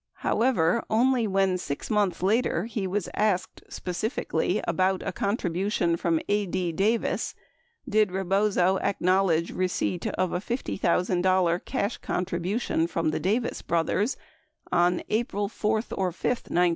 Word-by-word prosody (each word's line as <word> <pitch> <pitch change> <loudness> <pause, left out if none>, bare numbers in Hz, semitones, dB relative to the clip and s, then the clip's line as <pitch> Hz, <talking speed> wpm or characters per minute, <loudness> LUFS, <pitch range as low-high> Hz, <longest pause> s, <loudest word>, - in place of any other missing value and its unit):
71 - - +1
However, 230 -5 +2
only 240 +1 +3
when 190 -2 +1
6 140 -5 -5
months 200 -5 +1
later 220 +4 +2
he 215 -4 -3
was 195 0 -2
asked 205 -4 0
specifically 190 +7 -2
about 185 0 +1
a - - -2
contribution 190 -3 0
from 165 -1 +1
A. 205 -1 +1
D. 180 -1 -1
Davis, 210 +7 0 0.5
did 215 -1 +3
Rebozo 190 0 +2
acknowledge 185 -3 +1
receipt 180 -1 -1
of 185 -1 -1
a 180 - 0
$50,000 185 -5 +1
cash 240 -4 -2
contribution 180 0 -1
from 165 -2 -1
the - - -2
Davis 225 +6 -1
brothers 180 +8 0 0.5
on 175 0 +2
"April 210 -2 0
4 215 +1 0
or 185 -2 -1
5," 175 - -19
1972. 180 -7 +1
190 Hz, 135 wpm, -26 LUFS, 175-210 Hz, 0.5 s, only